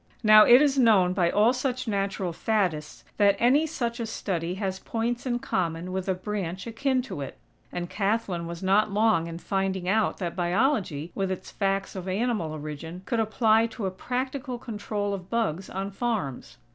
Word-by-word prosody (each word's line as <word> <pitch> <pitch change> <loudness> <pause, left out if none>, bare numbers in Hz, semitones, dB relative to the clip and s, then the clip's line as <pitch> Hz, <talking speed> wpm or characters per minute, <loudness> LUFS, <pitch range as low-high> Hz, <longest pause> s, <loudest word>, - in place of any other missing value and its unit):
Now 215 0 +8
it 245 +4 +8
is 280 -2 +2
known 200 -7 +5
by 180 -3 +2
all 215 +6 +4
such 255 -1 -2
natural 195 -3 -1
"faddists" 180 -7 -1
that 200 -1 +5
any 275 +8 +3
such 240 -6 -3
a 230 - -2
study 180 -5 -3
has 190 -1 -3
points 235 +4 -2
in 240 -1 +1
common 175 -5 -2
with 190 +1 -3
a 190 - +2
branch 185 -2 -4
akin 255 +3 0
to 240 - -6
it; 135 - -7 0.3
and 175 0 -4
Kathlyn 195 -4 -1
was 170 +2 -7
not 200 +3 +3
long 210 -5 +2
in 165 0 -6
finding 190 0 -2
out 215 +2 +2
that 175 -3 -4
Biology, 180 - 0
with 195 -1 -1
its 185 - -5
facts 195 -1 -1
of 185 -1 -6
animal 200 -4 -1
origin, 155 +3 -7
could 230 +5 -1
apply 220 0 +3
to 225 -2 -6
a 190 - -1
practical 255 +5 -3
control 205 -3 -3
of 190 -2 -6
bugs 195 -6 -1
on 195 +1 -4
farms. 200 - -3
200 Hz, 180 wpm, -26 LUFS, 180-230 Hz, 0.3 s, Now